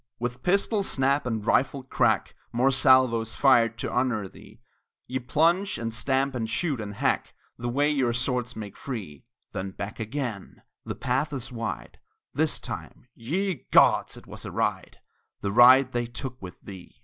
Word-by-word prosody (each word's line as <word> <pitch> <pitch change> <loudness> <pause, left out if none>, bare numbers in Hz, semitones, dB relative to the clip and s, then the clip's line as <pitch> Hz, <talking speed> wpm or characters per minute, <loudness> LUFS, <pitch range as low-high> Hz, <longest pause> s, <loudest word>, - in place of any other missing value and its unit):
With 120 +1 -4
pistol 200 +3 +1
snap 140 -6 +1
and 110 -3 -3
rifle 135 +2 +1
crack 130 - +1 0.2
Mere 125 +3 +2
salvos 130 -4 +4
fired 120 -5 +4
to - - -4
honor 125 -6 0
thee - - -16 0.5
Ye 130 +1 -3
plunge, 165 +10 +1
and 115 0 -4
stamp, 135 +4 0
and 115 -3 -3
shoot, 145 -3 -1
and 100 -1 -6
hack - - -1 0.2
The 120 +1 -3
way 145 +4 +2
your 130 -5 +1
swords 125 0 -2
make 105 -3 -7
free; 105 - -7 0.3
Then 100 -1 -4
back 100 +3 -7
again, 115 -3 -5 0.2
the - - -5
path 130 +4 -1
is 135 -1 -5
wide 115 -2 -5 0.3
This - - 0
time, 125 - -8
ye 180 - -3
gods! - - +4
it - - -13
was - - -9
a - - -6
ride, - - -2 0.4
The 100 - -2
ride 130 +4 +7
they 120 -1 -1
took 125 +1 -7
with 90 -2 -9
thee! 95 +3 -12
125 Hz, 165 wpm, -26 LUFS, 115-135 Hz, 0.5 s, ride